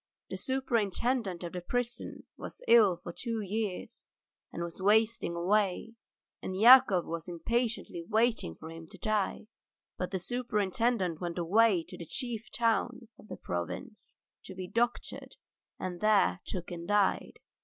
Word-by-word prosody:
The -, -, -2 dB
superintendent 235 Hz, -5 st, -1 dB
of 170 Hz, -, -6 dB
the 180 Hz, -, -4 dB
prison 240 Hz, +5 st, -3 dB
was -, -, -9 dB
ill 210 Hz, -7 st, +6 dB
for 175 Hz, 0 st, -8 dB
two 230 Hz, +2 st, -3 dB
years 210 Hz, +2 st, -4 dB, 0.5 s
and 170 Hz, -, -4 dB
was 170 Hz, +2 st, -7 dB
wasting 220 Hz, -1 st, +2 dB
away, 200 Hz, +4 st, +1 dB, 0.5 s
and 185 Hz, 0 st, -4 dB
Yakov 235 Hz, -6 st, +8 dB
was 165 Hz, +1 st, -5 dB
impatiently 220 Hz, 0 st, -2 dB
waiting 220 Hz, -, +1 dB
for 160 Hz, -, -10 dB
him 165 Hz, 0 st, -10 dB
to 195 Hz, -, -12 dB
die, 215 Hz, +2 st, -1 dB, 0.5 s
but 180 Hz, -, -2 dB
the 190 Hz, -, -2 dB
superintendent 210 Hz, -4 st, -1 dB
went 175 Hz, -1 st, -4 dB
away 190 Hz, +1 st, +3 dB
to -, -, -10 dB
the 170 Hz, -, -8 dB
chief 240 Hz, -, -4 dB
town 230 Hz, 0 st, 0 dB
of -, -, -15 dB
the -, -, -7 dB
province 85 Hz, -1 st, -6 dB, 0.3 s
to 190 Hz, -, -9 dB
be 185 Hz, -1 st, -6 dB
doctored, 235 Hz, +4 st, -2 dB, 0.4 s
and 180 Hz, -2 st, -5 dB
there 205 Hz, -, +3 dB
took 180 Hz, -2 st, -5 dB
and 170 Hz, -1 st, -6 dB
died. 205 Hz, -1 st, +1 dB
205 Hz, 145 wpm, -30 LUFS, 175-230 Hz, 0.5 s, Yakov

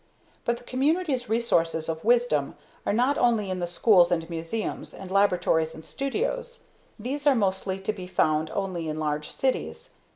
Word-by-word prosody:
But 235 Hz, 0 st, +1 dB
the 245 Hz, -, -15 dB
community's 270 Hz, 0 st, 0 dB
resources 165 Hz, -8 st, +1 dB
of 160 Hz, 0 st, -3 dB
wisdom 235 Hz, -, +2 dB, 0.3 s
are -, -, +3 dB
not 250 Hz, +7 st, +2 dB
only 225 Hz, -5 st, +2 dB
in 185 Hz, -, -2 dB
the 175 Hz, -, -1 dB
schools 175 Hz, +1 st, +4 dB
and 165 Hz, -2 st, 0 dB
museums, 165 Hz, +7 st, -4 dB
and 190 Hz, -1 st, -9 dB
laboratories 180 Hz, -5 st, +2 dB
and 160 Hz, -, -11 dB
studios 485 Hz, -, -3 dB, 0.3 s
these 275 Hz, +6 st, -3 dB
are 280 Hz, -, +6 dB
mostly 190 Hz, -3 st, 0 dB
to 205 Hz, +2 st, -1 dB
be 185 Hz, -3 st, -8 dB
found 155 Hz, -3 st, +1 dB
only 180 Hz, -5 st, -2 dB
in 155 Hz, -, -3 dB
large 150 Hz, -1 st, -2 dB
cities. 360 Hz, -, -2 dB
200 Hz, 165 wpm, -26 LUFS, 165-250 Hz, 0.3 s, are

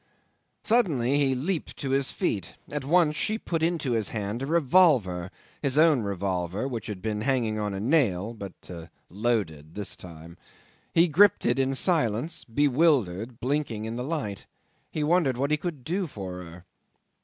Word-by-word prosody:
'Suddenly 145 Hz, -, +2 dB
he 135 Hz, -2 st, +2 dB
leaped 160 Hz, +6 st, -3 dB
to 135 Hz, -, -3 dB
his 135 Hz, 0 st, +1 dB
feet; 100 Hz, -, -2 dB
at 145 Hz, -2 st, -3 dB
once 155 Hz, +1 st, +3 dB
she 215 Hz, +7 st, 0 dB
put 165 Hz, -7 st, -3 dB
into 165 Hz, -5 st, 0 dB
his 110 Hz, -3 st, 0 dB
hand 105 Hz, +2 st, -3 dB
a 135 Hz, -, -3 dB
revolver, 135 Hz, -, +3 dB, 0.3 s
his 140 Hz, -1 st, 0 dB
own 155 Hz, -5 st, +5 dB
revolver, 95 Hz, +1 st, -2 dB
which 120 Hz, -5 st, -5 dB
had 100 Hz, -4 st, -6 dB
been 105 Hz, -1 st, -2 dB
hanging 115 Hz, -4 st, 0 dB
on 105 Hz, -1 st, -2 dB
a 95 Hz, -, -4 dB
nail, 115 Hz, -, +1 dB
but 100 Hz, -4 st, -10 dB, 0.4 s
loaded 95 Hz, -8 st, -2 dB
this 100 Hz, -3 st, -3 dB
time. 85 Hz, 0 st, -12 dB, 0.5 s
He 170 Hz, +2 st, +4 dB
gripped 195 Hz, +5 st, +4 dB
it -, -, +2 dB
in 135 Hz, 0 st, +1 dB
silence, 145 Hz, -, +1 dB
bewildered, 125 Hz, -, +1 dB
blinking 125 Hz, -5 st, -2 dB
in 115 Hz, +1 st, -4 dB
the 125 Hz, -, -3 dB
light. 130 Hz, -, -4 dB, 0.4 s
He 155 Hz, -, -2 dB
wondered 150 Hz, -5 st, +2 dB
what 140 Hz, +3 st, 0 dB
he 150 Hz, -, +3 dB
could 155 Hz, -4 st, -5 dB
do 180 Hz, +5 st, -1 dB
for 95 Hz, -, -7 dB
her. 85 Hz, +1 st, -12 dB
125 Hz, 165 wpm, -27 LUFS, 100-150 Hz, 0.5 s, own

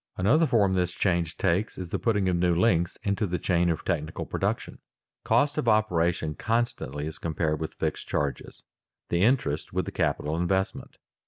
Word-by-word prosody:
Another 140 Hz, -, +4 dB
form 105 Hz, -7 st, +3 dB
this 90 Hz, -2 st, 0 dB
change 85 Hz, -3 st, 0 dB
takes 95 Hz, +4 st, 0 dB
is 90 Hz, -2 st, -6 dB
the -, -, -2 dB
putting 105 Hz, -5 st, +1 dB
of 90 Hz, -, +2 dB
new 85 Hz, 0 st, +2 dB
links 85 Hz, -3 st, +2 dB
into 100 Hz, +1 st, 0 dB
the 90 Hz, 0 st, -1 dB
chain 90 Hz, -1 st, +1 dB
of 80 Hz, -, -2 dB
technical 80 Hz, -4 st, -2 dB
production. -, -, -3 dB, 0.4 s
Cost 145 Hz, +1 st, +2 dB
of 125 Hz, -, -2 dB
operation 90 Hz, -7 st, +2 dB
constantly 90 Hz, -, -2 dB
is 80 Hz, -, -6 dB
compared 80 Hz, -1 st, -1 dB
with 80 Hz, -, -4 dB
fixed -, -, -3 dB
charges, 70 Hz, -3 st, -3 dB, 0.5 s
the 85 Hz, -, +1 dB
interest 105 Hz, -, +1 dB
with -, -, 0 dB
the -, -, -5 dB
capital 75 Hz, +2 st, -1 dB
investment. 95 Hz, +3 st, -1 dB
90 Hz, 170 wpm, -27 LUFS, 80-105 Hz, 0.5 s, Another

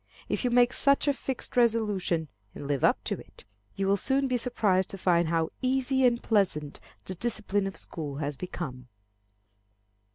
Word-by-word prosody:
If -, -, -2 dB
you 250 Hz, -, +2 dB
make 245 Hz, 0 st, +4 dB
such 280 Hz, +1 st, +3 dB
a 285 Hz, -, +4 dB
fixed 265 Hz, -1 st, -4 dB
resolution, 210 Hz, -9 st, +1 dB, 0.3 s
and 140 Hz, -, -7 dB
live 140 Hz, -3 st, -1 dB
up -, -, +3 dB
to -, -, -3 dB
it, -, -, -14 dB, 0.3 s
you 195 Hz, -, -1 dB
will 200 Hz, +1 st, +3 dB
soon 270 Hz, +6 st, +1 dB
be 255 Hz, -, 0 dB
surprised 210 Hz, -6 st, +1 dB
to 195 Hz, -, -5 dB
find 175 Hz, -2 st, +2 dB
how 165 Hz, 0 st, +1 dB
easy 265 Hz, 0 st, +2 dB
and 235 Hz, -1 st, +1 dB
pleasant 175 Hz, -9 st, 0 dB, 0.3 s
the 185 Hz, -, -4 dB
discipline 205 Hz, -1 st, -1 dB
of 195 Hz, -, -7 dB
school 150 Hz, -4 st, -6 dB
has 145 Hz, 0 st, -3 dB
become. 135 Hz, -7 st, -6 dB
195 Hz, 170 wpm, -28 LUFS, 165-245 Hz, 0.3 s, make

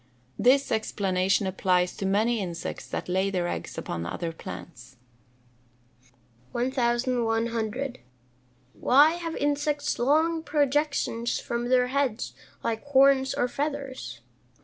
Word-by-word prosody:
This 260 Hz, +6 st, +4 dB
explanation 195 Hz, -3 st, +1 dB
applies 180 Hz, -1 st, +1 dB
to 195 Hz, -, -2 dB
many 220 Hz, +4 st, +2 dB
insects 175 Hz, -4 st, -5 dB
that -, -, -4 dB
lay 190 Hz, +2 st, +1 dB
their 180 Hz, -3 st, -1 dB
eggs -, -, -5 dB
upon 85 Hz, -1 st, -4 dB
other 170 Hz, -, -3 dB
plants. 120 Hz, -, -10 dB, 1.6 s
1100. 240 Hz, -1 st, 0 dB, 0.8 s
_Why 300 Hz, +6 st, +5 dB
have 330 Hz, -1 st, -4 dB
insects 290 Hz, 0 st, 0 dB
long 315 Hz, +6 st, +2 dB
projections 290 Hz, -5 st, 0 dB
from 240 Hz, +1 st, -3 dB
their 250 Hz, -1 st, +3 dB
heads, 265 Hz, -4 st, -1 dB, 0.3 s
like 225 Hz, -1 st, -2 dB
horns 270 Hz, -1 st, +4 dB
or 245 Hz, -, +1 dB
feathers? 270 Hz, -, -4 dB
240 Hz, 105 wpm, -27 LUFS, 195-280 Hz, 1.6 s, Why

